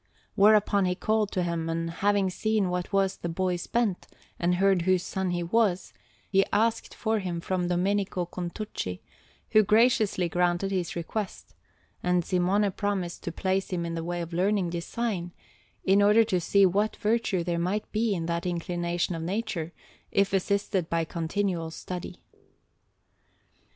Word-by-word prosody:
Whereupon 205 -1 +4
he 180 0 0
called 215 +1 0
to 185 - 0
him, 170 -1 -2
and, 165 0 -2
having 200 +1 +1
seen 215 0 0
what 180 +2 -3
was 195 -1 +1
the 170 - -4
boy's 180 +1 -1
bent, 230 -6 0 0.3
and 175 +1 +2
heard 195 -1 +3
whose 185 0 +2
son 190 -1 -2
he 175 -1 -1
was, 190 0 +1 0.3
he 195 -1 +4
asked 225 +2 +1
for 220 -1 0
him 180 -3 -3
from 180 +1 -1
Domenico 185 +1 0
Contucci, 175 - -5 0.5
who 215 - +7
graciously 215 -3 +3
granted 175 +3 0
his 180 -3 -2
request; 190 +4 -5 0.5
and 180 -1 +1
Simone 195 +3 +2
promised 190 -3 -2
to 170 - -2
place 190 +3 -1
him 175 -2 -2
in 165 - -3
the 165 0 -3
way 175 +1 -3
of 170 0 -6
learning 185 0 +1
design, 175 0 -3 0.5
in 195 +2 +4
order 210 +3 +6
to 190 -5 0
see 200 +3 +4
what 205 +4 +1
virtue 215 -4 0
there 170 0 -1
might 190 +5 -2
be 220 -1 +1
in 165 -2 -3
that 170 +1 -2
inclination 175 0 -1
of 165 - -4
nature, 180 -2 -3 0.4
if 200 0 +2
assisted 195 -2 0
by 165 -1 0
continual 170 +1 -2
study. 180 +2 -7
185 Hz, 155 wpm, -27 LUFS, 175-205 Hz, 0.5 s, who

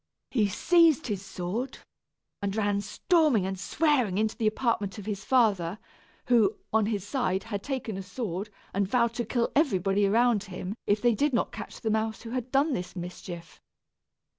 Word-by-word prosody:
He 220 -6 +3
seized 320 - +4
his 200 -5 -3
sword, 200 +9 -4 0.6
and 200 0 -2
ran 205 -2 +1
storming 305 - +2
and 190 0 -3
swearing 260 - +1
into 215 +1 +1
the 225 -3 0
apartment 215 -4 0
of 205 - -8
his 210 -1 -4
father, 205 -9 +2 0.5
who, 220 -4 +3 0.2
on 220 -2 +3
his 205 -3 -2
side, 200 -7 0
had 205 -3 -4
taken 250 -6 -4
a - - -4
sword, 195 0 -4 0.2
and 200 0 +1
vowed 235 +1 +2
to 240 0 -2
kill 235 +2 0
everybody 200 - +2
around 225 0 +3
him 185 0 -5
if 205 +2 +2
they 240 -1 +5
did 285 +6 +1
not 235 - +1
catch - - -8
the 220 - 0
mouse 220 -1 -1
who 230 - -7
had 250 0 -3
done 280 +2 +3
this 180 -4 -4
mischief. 175 -1 -8
215 Hz, 175 wpm, -28 LUFS, 195-245 Hz, 0.6 s, they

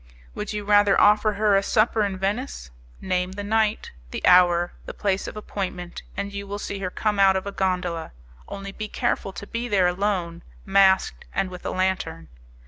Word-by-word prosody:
"Would 210 -1 -5
you 210 -1 -4
rather 205 -1 +5
offer 210 +1 +4
her 205 0 +2
a 195 - +4
supper 215 +1 +2
in 195 -2 -2
Venice? 200 - -3 0.3
Name 185 0 -1
the 205 +1 -5
night, 215 +1 0 0.2
the - - -4
hour, 175 -1 +5
the - - -7
place 195 -1 -1
of - - -7
appointment, 185 -4 -5 0.2
and 200 0 -3
you 200 0 -6
will 200 +1 -4
see 200 -1 -5
her 185 -2 -2
come 210 +2 -1
out 195 -1 +6
of 190 - -2
a 200 - -4
gondola. 180 -4 -2 0.4
Only 195 0 -7
be 215 +2 -6
careful 195 - -1
to 185 - -8
be 230 +3 -4
there 200 -5 +3
alone, 180 -2 -1 0.2
masked 195 -1 +3
and 185 - 0
with 180 - -7
a - - 0
lantern. 185 -3 -2
195 Hz, 190 wpm, -24 LUFS, 185-205 Hz, 0.4 s, out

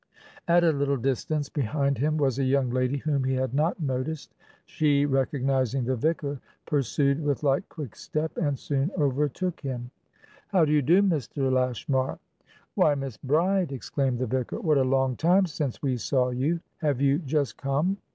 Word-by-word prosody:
At 175 0 +5
a 165 - +5
little 140 -1 0
distance 135 +4 -1
behind 140 -1 -1
him 155 +3 +1
was 135 -3 +1
a - - +1
young 130 -1 +1
lady 130 +2 0
whom 140 -1 -1
he 130 0 0
had 130 -1 -1
not 155 +6 +1
noticed; 140 +1 -3 0.3
she, 145 -2 +2
recognizing 135 -2 0
the 130 +1 0
vicar, 145 +1 -1 0.3
pursued 140 0 +1
with 145 -1 -1
light, 140 -1 +1
quick 140 -9 -8
step, 155 +6 -3
and 145 -4 0
soon 140 +3 -1
overtook 150 +4 0
him. 125 -3 -5 0.6
"How 185 -5 +3
do 150 - -1
you 150 -1 +4
do, 175 +9 +4
Mr. 140 - 0
Lashmar!" 130 +1 0 0.6
"WhyMiss 135 -6 +1
Bride!" 170 +4 +1
exclaimed 135 -1 -1
the 130 - -1
vicar. 130 +1 -2
"What 150 -4 +2
a - - +3
long 130 -1 +1
time 180 +4 +4
since 150 -6 -4
we 130 -3 0
saw 125 +1 +1
you! 145 +7 0 0.2
Have 145 -5 0
you 140 +1 +3
just 140 - -1
come?" 145 +8 0
140 Hz, 170 wpm, -26 LUFS, 130-155 Hz, 0.6 s, At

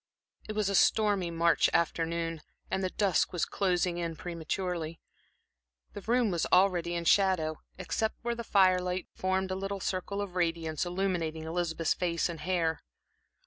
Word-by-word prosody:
It - - -2
was 210 -2 0
a 200 - 0
stormy 200 -2 +3
March 170 0 +3
afternoon, 165 -1 0 0.3
and 190 - 0
the 185 - 0
dusk 195 -3 +1
was 175 - 0
closing 180 -2 0
in 165 -1 -3
prematurely. 170 0 -4 0.9
The 205 - -7
room 235 0 +2
was 170 -2 0
already 175 -2 +3
in 170 0 -3
shadow, 175 -5 +3 0.2
except 220 +4 -1
where 235 0 0
the 235 0 -5
firelight 185 -3 +2
formed 190 0 -1
a - - -1
little 195 +1 -3
circle 190 +2 -3
of 200 -3 -4
radiance, 165 -2 -1
illumining 175 -4 -1
Elizabeth's 165 0 -1
face 170 -1 0
and 165 -2 -6
hair. 165 -1 0
180 Hz, 150 wpm, -30 LUFS, 165-190 Hz, 0.9 s, stormy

